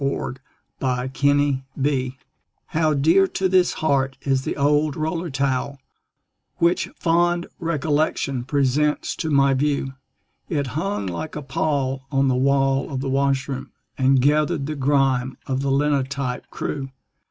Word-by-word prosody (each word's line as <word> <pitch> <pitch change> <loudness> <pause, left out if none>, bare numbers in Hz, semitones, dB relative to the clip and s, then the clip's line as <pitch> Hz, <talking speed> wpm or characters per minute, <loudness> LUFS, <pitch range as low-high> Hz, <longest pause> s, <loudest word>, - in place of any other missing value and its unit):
THE - - +2
OLD 130 +1 -5 0.4
ROLLER 125 -1 -1
TOWEL 140 -1 0 0.6
How 155 -1 +1
dear 165 +8 +4
to 190 - 0
this 185 -1 +3
heart 135 -3 0
is 135 -2 +1
the - - -4
old 145 +1 +2
roller 165 +2 -2
towel 140 0 -1 0.8
Which 170 +1 +2
fond 175 +1 +1
recollection 150 -5 0
presents 145 +2 +1
to 160 - -2
my 140 -2 +4
view. 140 -1 0 0.6
It 145 -5 0
hung 175 - -2
like 95 - -5
a 150 - -5
pall 135 -2 -1
on 135 -1 +2
the 130 - +2
wall 135 +1 +2
of 130 -1 -3
the 135 - -2
washroom, 135 0 -1 0.2
And 130 0 +3
gathered 145 +1 +2
the 155 - -3
grime 135 -2 +1
of 130 0 -1
the 140 - -1
linotype 140 -2 0
crew. 135 -2 -4
140 Hz, 140 wpm, -22 LUFS, 135-150 Hz, 0.8 s, dear